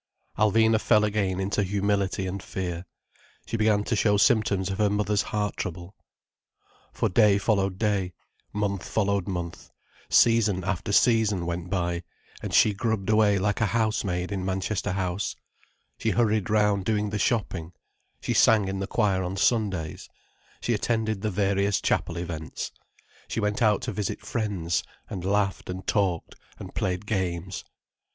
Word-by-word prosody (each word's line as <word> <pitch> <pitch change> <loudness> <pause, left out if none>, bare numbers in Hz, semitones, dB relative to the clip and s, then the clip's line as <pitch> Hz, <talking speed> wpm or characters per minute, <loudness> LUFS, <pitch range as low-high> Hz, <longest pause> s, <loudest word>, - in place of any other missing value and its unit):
Alvina 110 +1 +3
fell 105 - +4
again 100 -3 0
into 100 +2 0
humility 100 0 0
and 95 +1 -4
fear: 90 -2 -4 0.6
she - - -4
began 110 -2 +2
to 115 - -1
show 105 -1 +3
symptoms 100 -4 +2
of 95 - -4
her 105 -1 +3
mother's 105 0 +1
heart 105 0 -2
trouble. 90 0 -5 1.0
For - - 0
day 105 0 +4
followed 100 -2 +1
day, 100 -4 0 0.4
month 100 -2 -1
followed 100 -3 0
month, 85 -3 -5 0.4
season 110 -5 +4
after 95 +3 -2
season 105 -4 +3
went 85 0 -4
by, 85 -2 -1 0.4
and - - -5
she 105 - +5
grubbed 110 -1 -1
away 105 -2 +4
like 100 +3 0
a 110 - +3
housemaid 100 -5 -1
in 95 -2 -2
Manchester 95 0 -2
House, 95 0 -2 0.6
she - - 0
hurried 110 -3 +1
round 105 -2 +2
doing 105 0 0
the 105 - -2
shopping, 95 -7 -1 0.5
she - - -1
sang 105 -3 +5
in 95 0 -3
the 95 - -3
choir 100 -5 +1
on 95 +1 -3
Sundays, 95 -8 0 0.5
she 120 - 0
attended 110 -1 -1
the 110 - 0
various 100 0 +1
chapel 85 - 0
events, 80 -4 -5 0.6
she - - -3
went 105 +3 -1
out 105 -3 +3
to 125 - -2
visit 105 -1 -3
friends, 100 -7 -1 0.3
and 90 - -4
laughed 100 -1 0
and 95 +1 -5
talked 95 -6 0 0.2
and - - -9
played 90 +1 -2
games. 95 -3 -2
100 Hz, 150 wpm, -26 LUFS, 95-105 Hz, 1.0 s, she